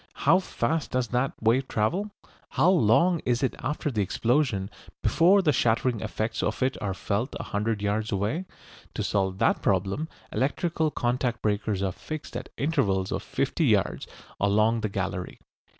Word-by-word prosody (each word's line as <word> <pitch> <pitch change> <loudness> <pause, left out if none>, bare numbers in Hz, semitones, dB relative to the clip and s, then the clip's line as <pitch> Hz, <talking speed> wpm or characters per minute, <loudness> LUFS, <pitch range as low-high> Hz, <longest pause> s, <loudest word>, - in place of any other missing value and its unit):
How 190 - +6
fast 160 -3 -2
does 125 -2 -1
that 125 +2 0
wave 120 +4 +2
travel? 175 - 0 0.4
How 180 - +3
long 170 - +4
is 120 +1 0
it 130 - 0
after 150 +1 -2
the 110 -4 0
explosion 115 -1 0 0.3
before 190 +4 +4
the 155 - +4
shattering 120 0 +1
effects 110 +1 -2
of - - -1
it 130 +1 +1
are 100 -2 -2
felt 105 +8 -2
a - - -3
hundred 105 0 -2
yards 105 +1 -1
away? 105 - -1 0.5
To - - -1
solve 95 -2 0
that - - +2
problem 100 - 0 0.2
electrical 160 +3 0
contact 120 -2 -1
breakers 105 -2 0
are 95 - 0
fixed 155 - -7
at 125 +1 -5
intervals 125 -11 0
of - - -2
fifty - - -1
yards - - +1 0.3
along 110 +3 +3
the 105 - -1
gallery. 95 -1 -4
115 Hz, 160 wpm, -27 LUFS, 105-145 Hz, 0.5 s, How